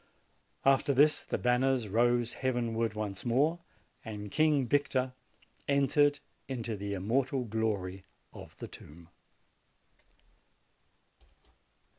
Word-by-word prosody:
"After 135 0 +4
this, 150 +3 +4
the - - -2
banners 125 -1 +1
rose 120 +3 +2
heavenward 115 -3 -1
once 105 -3 -4
more, 145 +8 +2 0.4
and 105 -2 -7
King 155 -4 +3
Victor 130 -2 +1 0.5
entered 145 +1 +3 0.3
into 120 -4 -3
the 100 0 -4
immortal 125 +7 0
glory 105 -4 -2 0.3
of - - -12
the - - -7
tomb." 80 +3 -14
120 Hz, 95 wpm, -31 LUFS, 105-135 Hz, 0.5 s, After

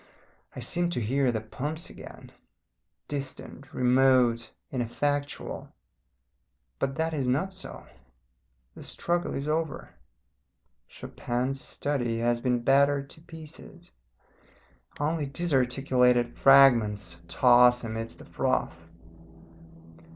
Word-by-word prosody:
I - - -6
seem 175 -1 -1
to - - +2
hear 130 +3 +1
the 110 -2 -2
pumps 145 +9 -6
again, - - -12 0.8
distant, 140 -1 -7
remote, 125 -2 +3 0.2
ineffectual. 145 +4 -3 1.1
But 135 0 -1
that 160 0 -1
is 140 -4 -1
not 155 +10 0
so; 190 - -9 0.9
the - - -12
struggle 175 0 -2
is 140 +2 -4
over. 155 - -2 1.0
Chopin's 130 +3 -4
Study 120 -5 -2
has 120 0 0
been 125 -2 0
battered 140 +1 +3
to 160 - -12
pieces; 160 - -12 1.1
only 150 0 -1
disarticulated 130 -5 +1
fragments 115 -10 +4
toss 125 +6 +5
amidst 115 0 -5
the - - -13
froth. 85 0 -2
135 Hz, 100 wpm, -27 LUFS, 120-145 Hz, 1.1 s, toss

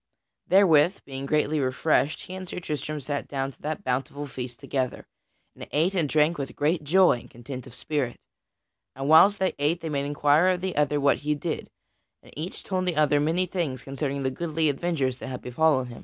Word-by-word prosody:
Therewith, 180 -2 +5
being 135 0 -6
greatly 150 +1 +1
refreshed 140 +2 +1
he 185 - -9
and 185 -1 -7
Sir - - -4
Tristram 155 -2 -4
sat 145 +1 -4
down 135 -1 -3
to - - -24
that 155 +7 -4
bountiful 135 +2 -2
feast 125 -3 -7
together, 130 -2 -3 0.5
and - - -9
ate 165 +6 +2
and 165 -6 0
drank 155 +2 +2
with 135 - -5
great 155 +2 +1
joy 175 -3 +4
and - - -15
content 125 +2 -8
of 125 - -13
spirit. 140 -6 -2 0.8
And 135 +1 -4
whiles 190 +7 +7
they 190 -1 0
ate 155 +4 0
each 160 - -3
made 140 -1 -1
inquiry 145 +5 +3
of 175 - -8
the 185 0 -3
other 145 0 +2
what 140 0 +3
he 150 0 -1
did, 160 +2 -4 0.5
and - - -17
each 160 +5 -6
told 185 -1 -1
the 175 - 0
other 150 -1 +3
many 165 +5 +1
things 160 -9 -3
concerning 140 0 -3
the 130 - 0
goodly 160 +2 0
adventures 140 -4 -1
that - - -7
had 130 -1 -6
befallen 130 +1 +2
him. 120 -2 -10
150 Hz, 200 wpm, -26 LUFS, 135-165 Hz, 0.8 s, whiles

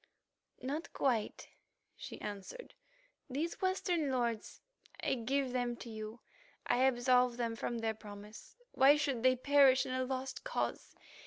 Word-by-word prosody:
"Not 290 +6 -3
quite," 235 -6 0 0.5
she - - -8
answered. 210 - -7 0.6
"These 300 +6 -3
Western 360 -5 +1
lords, 235 -4 -2 0.4
I - - +2
give 265 +2 0
them 245 -1 -1
to 235 - -9
you; 220 +1 -7 0.4
I 245 - +2
absolve 250 -1 +3
them 230 -2 -1
from 235 +1 -3
their 225 -1 -1
promise. 210 0 -11 0.2
Why 275 +2 +6
should 285 -5 0
they 255 +1 +5
perish 270 0 +5
in 255 - -3
a 255 0 0
lost 265 0 -4
cause? - - -3
255 Hz, 140 wpm, -34 LUFS, 230-275 Hz, 0.6 s, Why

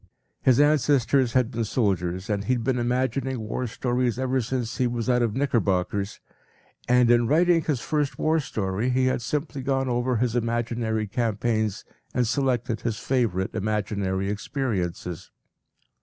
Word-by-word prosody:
His 130 -1 +4
ancestors 140 -3 +3
had 125 -2 +2
been 115 -1 -1
soldiers, 95 -5 -1
and 105 -1 -1
he 130 - +2
had 120 -2 -1
been 125 +1 0
imagining 130 +1 -1
war 110 +3 -3
stories 120 +1 -1
ever 130 0 0
since 125 0 -3
he 125 - +2
was 120 -1 -3
out 125 -1 +3
of 115 -2 0
knickerbockers, 100 -7 0 0.7
and 125 -1 +5
in 120 -1 +4
writing 165 +4 +4
his 145 -7 -1
first 150 -2 -1
war 160 +1 +2
story 110 -5 -2
he 130 +1 +2
had 130 -1 +1
simply 145 +2 -3
gone 135 0 0
over 120 +1 0
his 120 0 0
imaginary 115 -2 -1
campaigns 110 -1 -1 0.3
and 125 - +2
selected 125 -3 0
his 115 -3 -2
favorite 115 -9 0
imaginary 100 -2 -1
experiences. 95 - -3
120 Hz, 150 wpm, -25 LUFS, 110-130 Hz, 0.7 s, and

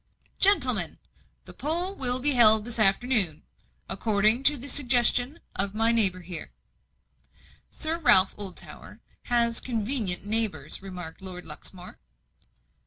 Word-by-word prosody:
"Gentlemen, 400 +1 +1 0.5
the - - -14
poll 345 +6 -7
will 250 -8 +4
be 290 +3 +4
held 220 -4 +4
this 240 -1 -5
afternoon, 200 - +3 0.4
according 215 +3 -2
to 295 0 +4
the 265 +3 -10
suggestion 250 +1 +1 0.2
of 195 +2 +1
my 225 +1 -2
neighbour 195 -6 0
here." 175 -2 -10 1.2
"Sir 320 +1 -6
Ralph 190 - +5
Oldtower 195 -3 -11 0.3
has 235 -1 -2
convenient 225 -5 -1
neighbours," 220 -1 -6
remarked 180 -3 -12
Lord 180 -2 -11
Luxmore. 175 +4 -13
225 Hz, 115 wpm, -22 LUFS, 190-255 Hz, 1.2 s, Ralph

